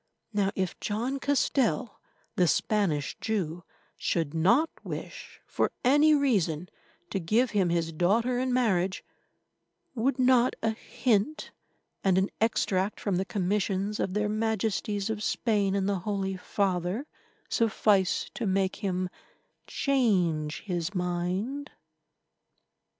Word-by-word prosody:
Now, 200 -2 +2
if 185 -2 -2
John 240 +6 -2
Castell, 265 -4 0 0.3
the 180 - +3
Spanish 170 -8 +1
Jew, 175 -6 -2 0.3
should 165 -3 -1
not 230 - +3
wish, - - -7
for - - 0
any 295 +4 +5
reason, 180 - +1 0.4
to 195 - 0
give 220 +9 +2
him 195 -5 +2
his 170 -1 0
daughter 230 +9 +2
in 255 0 0
marriage, 195 -7 +1 0.9
would 265 +3 0
not 255 -1 +4
a 225 - +2
hint 235 +4 -1 0.5
and 190 -2 +3
an 190 +1 +1
extract 205 -3 +1
from 195 -4 -1
the 190 - 0
Commissions 200 +1 -1
of 190 - -1
their 210 0 +1
Majesties 215 -1 -1
of 215 -1 -4
Spain 205 -3 +1
and 195 -1 0
the 200 -2 0
Holy 195 0 -2
Father 185 - -1 0.4
suffice 210 -4 +2
to 230 - -3
make 190 0 +1
him 185 -3 -1 0.6
change 180 - +1
his 180 0 -3
mind? 180 +11 -2
200 Hz, 120 wpm, -28 LUFS, 185-230 Hz, 0.9 s, any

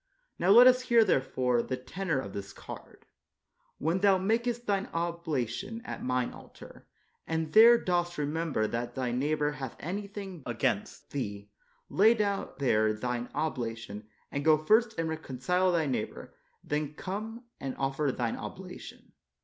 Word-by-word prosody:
Now 175 - +1
let 235 +5 +9
us 255 0 +6
hear, 235 -2 +5
therefore, 130 - +1
the 130 +2 -3
tenor 165 +5 -3
of 100 -6 -6
this 100 0 -6
card: - - -11 0.2
' - - -57
' - - -43
When 165 +5 0
thou 195 -1 +5
makest 235 +5 0
thine 200 -1 0
oblation 170 - -2
at - - -6
Mine 125 -1 0
altar, - - -14 0.4
and 160 -1 -2
there 230 +2 +9
dost 175 -4 -1
remember 150 -5 -1
that 120 +2 -3
thy 130 -2 -1
neighbor 150 +4 0
hath 135 -4 -6
anything 195 0 -5
against 115 -3 -2
thee, 105 -6 -5 0.4
lay 220 +5 +5
down 205 -3 -1
there 110 -5 +2
thine 125 +2 -3
obla 120 -7 -2
tion, 105 -2 -9 0.2
and 140 - -2
go 155 0 +6
first 220 +8 +3
and 165 0 0
reconcile 160 +4 0
thy 165 -3 +2
neighbor, 135 -3 -4 0.3
and - - -21
then 150 0 -1
come 215 +7 -5 0.2
and 135 -1 -5
offer 135 +1 0
thine 120 -2 -2
oblation." - - -9
155 Hz, 155 wpm, -30 LUFS, 125-195 Hz, 0.4 s, let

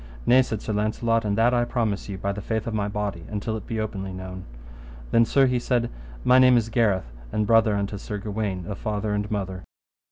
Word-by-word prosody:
Nay, 130 +1 +6
said 110 -5 -3
Sir 110 - -2
Launcelot, 115 +2 +1
and 100 0 0
that 120 +2 +4
I 120 -1 +3
promise 115 -5 -1
you 100 - -4
by 100 +1 -2
the 100 +1 -5
faith 110 +1 -2
of 115 - -3
my 105 -2 0
body, 100 -4 -3
until 105 +1 -3
it 110 - -7
be 115 -3 -3
openly 100 -3 -4
known. 95 0 -7 0.7
Then, 115 - +5
sir, 135 +3 +4
he 125 -1 +1
said, 120 -1 0 0.3
my 125 +1 +6
name 130 -1 +7
is 115 -1 0
Gareth, 105 - +1 0.2
and 105 0 0
brother 110 -1 +4
unto 100 0 -2
Sir 105 +1 -5
Gawaine 100 -3 -3
of 100 +2 -6
father 105 -1 -2
and 105 0 -2
mother. 95 -3 -3
105 Hz, 220 wpm, -25 LUFS, 100-115 Hz, 0.7 s, name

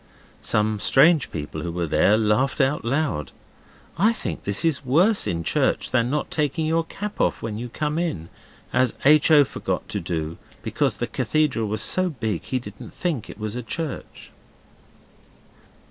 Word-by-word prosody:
Some 105 0 0
strange 150 +6 +4
people 80 0 -5
who 85 +1 -4
were 85 0 -2
there 100 +6 +3
laughed 110 +6 +1
out 140 +2 +1
loud. 120 - -1 0.7
I 215 +5 +5
think - - -6
this 100 +9 0
is 160 -4 +1
worse 175 - +3
in 85 -1 -2
church - - 0
than 120 -1 +2
not 150 +2 -2
taking 155 +1 0
your 165 +1 +1
cap 210 +4 -5
off - - 0
when 110 -1 -4
you 120 +1 -5
come 150 +5 -2
in, 120 - -3 0.4
as 130 -2 +2
H. 150 +2 +6
O. 150 -2 +7
forgot - - -4
to - - -2
do, 80 -1 -4 0.2
because - - 0
the - - -1
cathedral 150 -8 0
was 110 +1 -1
so 185 0 +3
big 110 - -3
he 130 - -3
didn't 105 -5 -9
think 160 - -2
it - - -9
was 105 0 -4
a 125 - -3
church. 155 +4 -6
130 Hz, 170 wpm, -23 LUFS, 105-155 Hz, 0.7 s, O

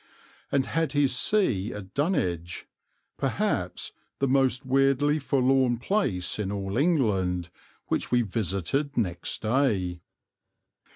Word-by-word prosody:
and 135 -1 +2
had 165 -3 -1
his 145 -3 +3
see 125 - +2
at 95 -2 -8
Dunwich, 90 - -1 0.5
perhaps - - -1 0.3
the 135 - +1
most 130 -1 +2
weirdly 135 +3 +3
forlorn 130 -3 +2
place 120 - -1
in 100 -2 -2
all 100 -1 -3
England, 100 - +1 0.3
which - - -1
we 120 -1 +3
visited 110 - -2
next 90 -7 -2
day. 105 -8 +1
125 Hz, 110 wpm, -27 LUFS, 95-140 Hz, 0.5 s, his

